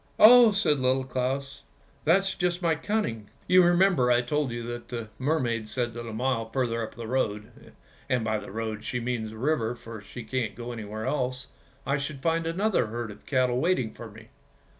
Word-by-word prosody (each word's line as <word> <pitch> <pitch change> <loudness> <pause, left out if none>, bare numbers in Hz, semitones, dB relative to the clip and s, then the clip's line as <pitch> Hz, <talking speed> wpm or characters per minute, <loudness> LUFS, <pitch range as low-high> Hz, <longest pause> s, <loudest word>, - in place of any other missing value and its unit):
"Oh," 235 0 +9
said 195 -8 +2
Little 130 +1 +2
Claus, 135 +2 -3 0.4
"that's 190 +4 +3
just 180 -1 -1
my 170 -3 +2
cunning; 160 - -2 0.2
you 185 0 +6
remember 175 -7 +4
I 120 0 +4
told 145 +2 0
you 120 0 -4
that 120 0 -6
the 115 -3 -5
mermaid 125 -6 0
said 120 +2 -1
that 120 0 -7
a - - -5
mile 115 0 -1
further 115 -2 -1
up 110 - -6
the 120 - -7
road 110 -2 -3 0.2
— - - -28
and 125 -3 +1
by 110 -1 0
the - - -9
road 110 0 -4
she 125 - -2
means 120 -2 -2
the 110 - -10
river, 125 -3 0
for 115 -2 -9
she 120 +3 -9
can't 110 -2 -2
go 120 +1 -6
anywhere 110 -1 -6
else 130 -1 -2 0.2
— 135 +2 -32
I 140 +1 +1
should 140 -1 -5
find 165 0 +1
another 190 - +1
herd 115 0 -4
of 105 - -15
cattle 125 -2 +2
waiting 155 -11 +1
for 115 - -9
me. 110 +1 -14
125 Hz, 205 wpm, -27 LUFS, 115-150 Hz, 0.4 s, Oh